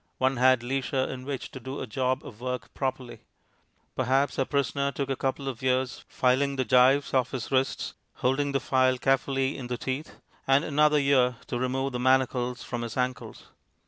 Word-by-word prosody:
One 130 0 +1
had 130 -1 +4
leisure 130 +1 -1
in 130 -1 -6
which 140 -2 -5
to 130 - -8
do 130 +3 -6
a - - -3
job 130 +3 -1
of 110 - -11
work 125 -3 -4
properly. 130 -2 -4 0.8
Perhaps 135 +2 +1
our 135 - +2
prisoner 140 0 0
took 140 0 -3
a - - +1
couple 135 +1 -2
of 130 -4 -4
years 130 0 0
filing 135 +2 +1
the 130 -1 0
gyves 130 +3 +4
off 130 -2 +2
his 130 -4 -5
wrists 130 0 0 0.2
(holding 140 +3 0
the 135 - +1
file 130 -2 +2
carefully 135 +1 +1
in 130 -3 -6
the 125 0 -3
teeth), 135 +5 -4 0.3
and 135 +2 +4
another 150 0 +3
year 135 -3 +3
to 120 - -3
remove 130 +2 -1
the 125 - -3
manacles 125 -1 +1
from 120 -1 -4
his 120 +1 -5
ankles. 125 0 -3
130 Hz, 185 wpm, -27 LUFS, 125-135 Hz, 0.8 s, had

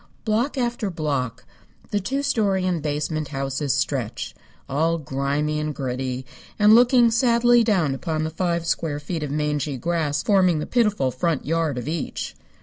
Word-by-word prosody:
Block 235 +6 0
after 240 -4 -1
block 135 - -3 0.5
the 205 - +1
two 270 +8 -2
story 205 -9 +1
and 175 -3 0
basement 150 +1 -2
houses 135 0 -2
stretch, 135 -5 -2 0.3
all 160 +5 +1
grimy 145 +1 -1
and 150 -1 -3
gritty 130 -1 -3 0.3
and 210 0 +6
looking 240 0 +6
sadly 235 0 +4
down 185 - +2
upon 155 +2 -2
the 160 - -2
five 170 0 -1
square 160 -3 -1
feet 160 +2 -4
of 150 - -3
mangy 150 -1 -1
grass 155 -2 -1
forming 185 -5 +3
the 150 - -2
pitiful 210 - +1
front 160 +3 -1
yard 160 -2 0
of 125 - -4
each. 160 0 -3
160 Hz, 155 wpm, -23 LUFS, 145-205 Hz, 0.5 s, and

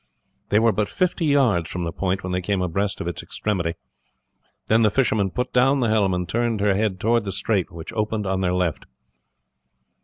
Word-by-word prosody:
They 105 - +3
were 115 +1 +4
but 105 +1 -1
fifty 180 -2 0
yards 125 - +2
from 90 - -4
the 85 - -2
point 95 +3 -2
when 90 - -4
they 90 0 -1
came 100 +1 -1
abreast 100 +3 -1
of - - -4
its 85 - -4
extremity; 85 -6 -2 0.9
then 110 +1 +3
the 110 - +5
fisherman 110 -5 +1
put 125 +7 -3
down 135 +3 +4
the 120 -3 +1
helm 100 -4 +2
and 90 -1 -3
turned 115 +1 0
her 100 0 +2
head 100 -2 -1
towards 115 +2 +1
the 100 - -3
strait, 100 -1 0
which 85 +5 -8
opened 105 -1 -1
on 95 0 -1
their 90 -1 +1
left. 90 -4 -1
100 Hz, 205 wpm, -23 LUFS, 90-115 Hz, 0.9 s, the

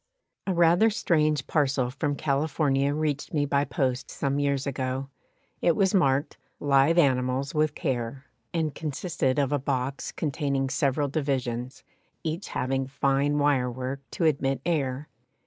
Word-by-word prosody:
A 190 - +1
rather 175 +6 +5
strange 155 - +1
parcel 135 -5 +1
from 145 +1 -1
California 140 -1 +1
reached 150 0 -2
me 145 -1 +2
by 140 0 +1
post 130 0 -1
some 140 0 -1
years 140 -1 0
ago. 135 0 -3 0.5
It 170 - +3
was 190 0 +2
marked 140 -5 +2 0.2
"Live 140 +3 +3
animals 130 -2 +2
with 155 -1 +1
care," 125 +1 -3 0.3
and 160 -3 -1
consisted 150 -3 -2
of 140 -2 +1
a 145 - +1
box, 135 0 -2
containing 140 -3 -1
several 140 +1 +1
divisions, 130 -4 -2 0.4
each 165 +4 -3
having 135 +1 -1
fine 140 +1 +1
wire 140 -4 +2
work 130 +2 -4
to 170 - 0
admit 135 -3 +1
air. 145 -4 -1
140 Hz, 140 wpm, -27 LUFS, 135-150 Hz, 0.5 s, rather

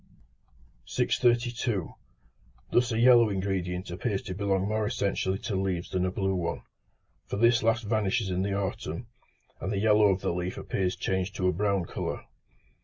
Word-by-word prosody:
632. 120 -5 +1 0.8
Thus 120 -1 +3
a 110 - 0
yellow 120 -1 +6
ingredient 95 -2 -2
appears 100 +3 -2
to 95 - -5
belong 100 0 0
more 110 0 0
essentially 95 -2 -1
to 100 - -4
leaves 95 -2 -2
than 95 -1 +1
a - - -2
blue 95 0 0
one; 85 -3 -2 0.6
for - - -3
this 115 +2 +4
last 115 +1 +2
vanishes 105 -1 0
in 90 +1 0
the 100 0 -1
autumn, 100 -1 -3 0.5
and 95 - -3
the 100 - -1
yellow 105 0 +5
of 95 -1 +1
the - - -1
leaf 90 +1 -3
appears 95 -1 -1
changed 95 +1 -2
to 90 - 0
a 90 - +2
brown 100 0 0
colour. - - -4
100 Hz, 165 wpm, -28 LUFS, 95-110 Hz, 0.8 s, yellow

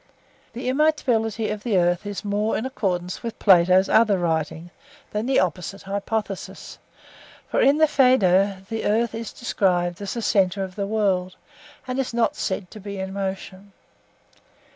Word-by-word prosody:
(4) - - -35 0.5
The 250 +2 -3
immobility 245 -7 +1
of 210 -1 -4
the 215 -4 0
earth 175 +2 +1
is 205 +1 -5
more 205 +2 0
in 225 - -3
accordance 185 -8 -2
with 230 -1 -6
Plato's 185 0 +5
other 215 -3 +4
writings 165 0 -2 0.4
than 210 +3 -2
the 270 - +3
opposite 180 +2 -2
hypothesis. 200 0 -4 0.7
For - - +2
in 280 +2 +5
the 315 - +6
Phaedo 200 -9 +3
the 225 0 -4
earth 225 +2 +1
is 225 0 -5
described 180 -6 0
as 200 +2 -4
the 235 - -3
centre 195 -1 +2
of 185 -1 -7
the 200 -1 -2
world, 190 -4 0 0.5
and 255 +1 -2
is 255 -3 -2
not 235 -1 +1
said 190 -2 -3
to 215 - -10
be 200 0 -7
in 190 0 -5
motion. 195 0 -5
200 Hz, 165 wpm, -23 LUFS, 185-225 Hz, 0.7 s, the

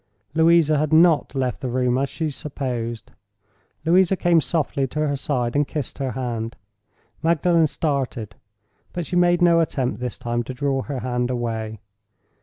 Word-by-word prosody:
Louisa 160 -2 +4
had 155 0 0
not 160 -3 +4
left 130 0 -1
the 130 - -2
room, 125 0 +1
as 140 0 0
she 160 -2 -3
supposed—Louisa 120 - -2
came 170 -2 +3
softly 140 -4 -1
to 150 +3 -1
her 140 - 0
side, 130 -4 -2
and 145 0 +2
kissed 145 -3 -5
her 130 -3 -2
hand. 115 -2 -3 0.7
Magdalen 165 0 +3
started; 135 -8 -2 0.6
but 175 -2 -3
she 180 - -4
made 175 0 +4
no 170 -1 +5
attempt, 135 -7 -1
this 125 -1 -4
time, 120 0 -2
to 130 +2 -6
draw 135 0 0
her 135 -2 -5
hand 125 -1 -1
away. 110 -3 -3
135 Hz, 155 wpm, -23 LUFS, 120-160 Hz, 0.7 s, no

